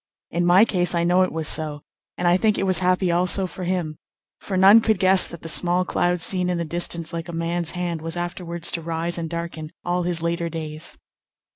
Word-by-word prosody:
In 175 +1 0
my 185 +5 +6
case 180 -4 -1
I 170 - +1
know 175 +2 +3
it 185 - +1
was 160 -2 -3
so, 150 -2 0 0.4
and 175 - -1
I 175 - +4
think 210 +2 +1
it 195 - -1
was 185 -1 +1
happy 180 0 +1
also 180 +2 +2
for 185 0 -7
him; 175 -4 -3 0.4
for 190 - -4
none 200 +4 +7
could 220 -2 +1
guess 190 0 +5
that 170 - -11
the - - -6
small 175 +2 +3
cloud 175 0 0
seen 180 +1 +1
in 180 - -1
the 170 - -3
distance 170 0 -2
like 165 0 -5
a - - -4
man's 165 0 -2
hand 175 -3 -3
was 165 +1 -3
afterwards 175 -1 -2
to 170 - -3
rise 165 +1 -3
and 165 -1 -4
darken 170 -2 -6 0.2
all 175 0 0
his 175 -1 0
later 170 0 -2
days. 155 0 -5
175 Hz, 225 wpm, -22 LUFS, 165-180 Hz, 0.4 s, none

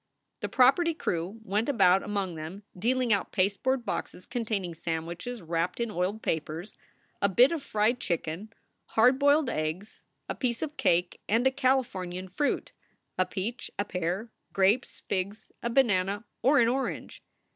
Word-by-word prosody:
The - - -3
property 320 +6 +4
crew 180 - -2
went 210 +5 0
about 195 -7 +5
among 200 -3 -2
them, 165 +6 -7
dealing 240 +4 +2
out 200 - -1
pasteboard 230 +7 +1
boxes 180 - -4
containing 210 -7 -2
sandwiches 170 +7 -4
wrapped 170 +4 -1
in 235 -2 -1
oiled 195 +3 -2
papers, 160 +4 -3 0.5
a 200 - +4
bit 245 - +6
of 330 -3 -2
fried 225 -1 +1
chicken, 170 +3 -3 0.5
hard 250 +4 +6
boiled 285 +1 +4
eggs, 165 +1 -3 0.2
a - - -2
piece 240 -1 -1
of 305 -1 -4
cake, 175 - +1
and 230 +4 +3
a 265 - +5
Californian 195 -9 0
fruit 285 +11 -1 0.5
a 185 - +3
peach, 210 +6 -4
a 205 - 0
pear, 185 +4 -2 0.2
grapes, 195 +6 +2
figs, 200 +3 -3
a 235 - -1
banana, 205 -5 +2 0.2
or 275 +4 +5
an 235 - +5
orange. 260 +3 -2
205 Hz, 150 wpm, -29 LUFS, 180-245 Hz, 0.5 s, bit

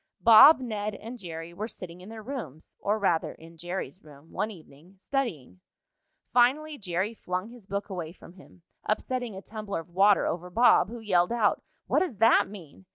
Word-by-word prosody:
Bob, 245 +6 +9
Ned 215 -4 -4
and 235 +4 -9
Jerry 165 -2 -7
were 210 +5 -4
sitting 180 -5 -10
in 185 - -11
their 220 -1 -9
rooms, 220 - -8
or 205 +2 0
rather, 175 -6 0
in 165 +1 -15
Jerry's 175 +3 -6
room, 150 +1 -17
one 215 - -2
evening, 165 -1 -15
studying. 185 - -3 0.7
Finally 285 +5 +2
Jerry 190 +2 -2
flung 185 -1 -4
his 235 -5 -14
book 200 0 -3
away 175 -5 -5
from 170 -1 -15
him, 185 -1 -18 0.2
upsetting 245 0 -2
a 190 - -9
tumbler 210 -5 -5
of 165 - -18
water 195 +3 +4
over 180 +1 -3
Bob, 230 +1 +4
who 235 0 -8
yelled 180 -4 +2
out: 230 -3 +1 0.2
"What - - +2
does 310 - -2
that 225 +2 +4
mean?" 160 - -12
200 Hz, 180 wpm, -27 LUFS, 175-225 Hz, 0.7 s, Bob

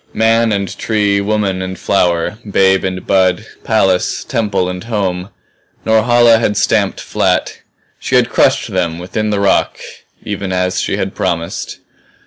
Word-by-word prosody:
Man 115 0 +2
and 100 -2 -2
tree, 105 -2 +1
woman 100 -2 -1
and 95 0 -5
flower, 90 +1 0
babe 95 -1 +3
and 95 -1 -4
bud, 95 +1 +2 0.2
palace, 95 -5 +1
temple 105 -5 -1
and 90 +1 -5
home 95 -5 -2 0.6
Norhala 115 +1 +4
had 105 -3 0
stamped 100 -2 +1
flat. - - -1 0.4
She - - -2
had - - +4
crushed - - +1
them 85 -3 -1
within 100 +5 -3
the 105 -1 0
rock 100 -1 +1 0.5
even 100 -2 -4
as 90 0 0
she 100 - -2
had 95 -1 -3
promised. 85 -2 -3
100 Hz, 140 wpm, -15 LUFS, 95-110 Hz, 0.6 s, Norhala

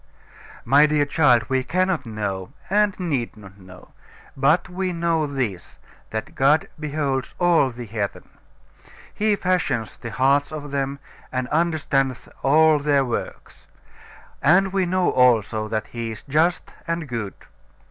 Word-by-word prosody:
My 140 +5 +6
dear 150 -1 +2
child, 145 -6 +3
we 130 -1 0
cannot 185 -2 0
know, 105 -2 -4 0.2
and 205 -1 +2
need 140 -11 -2
not 95 -2 -14
know. 90 -1 -15 0.5
But 145 +6 +2
we 185 0 -3
know 165 -2 0
this 125 -11 -4 0.3
that 110 0 -5
God 145 +4 +3
beholds 145 -3 -2
all 170 -6 +3
the 120 -1 -8
heathen. 105 -2 -4 0.9
He 210 0 +1
fashions 180 - -1
the 120 - -7
hearts 135 +7 +2
of 145 -2 -7
them, 140 0 -2 0.3
and 130 -1 -2
understandeth 145 -5 0
all 155 +2 +5
their 145 -2 +2
works. 120 - -6 0.7
And 185 +6 +4
we 190 -2 +1
know 185 0 +1
also 110 -4 +3
that 110 0 -2
He 115 -1 -5
is 110 -2 -8
just 160 +5 0
and 165 -2 -2
good. 115 -6 -4
140 Hz, 135 wpm, -23 LUFS, 120-165 Hz, 0.9 s, My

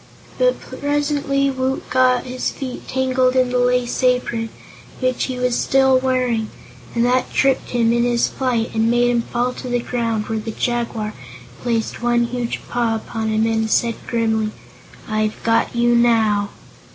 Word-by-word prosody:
But - - +3
presently 285 -1 -1
Woot 260 0 -2
got 255 -1 +3
his 255 0 -3
feet 260 -3 -7
tangled 260 -1 +1
in 255 -1 +3
the 250 - +1
Lace 245 0 +1
Apron, 250 -3 +1 0.5
which 255 -1 0
he 255 -1 -4
was 250 -1 0
still 265 0 +3
wearing, 250 -4 0 0.5
and 235 0 +2
that 250 +1 +1
tripped 270 -1 +1
him 235 -1 +2
in 235 0 +2
his 240 -1 +2
flight 245 -4 -1
and 225 +1 +2
made 240 +1 +3
him 240 -1 +2
fall 245 +2 -1
to 255 - -8
the 245 - +1
ground, 230 -3 -2
where 225 -1 -2
the 215 - -6
Jaguar 230 -2 -2 0.5
placed 230 -2 -2
one 240 0 +2
huge 235 0 -3
paw 235 -2 0
upon 220 0 -4
him 220 0 +2
and 220 -1 0
said 235 +1 +2
grimly: 220 -2 0 0.6
"I've 215 0 0
got 230 +1 +1
you, 240 0 +3
now!" 220 -4 +3
240 Hz, 165 wpm, -20 LUFS, 225-255 Hz, 0.6 s, But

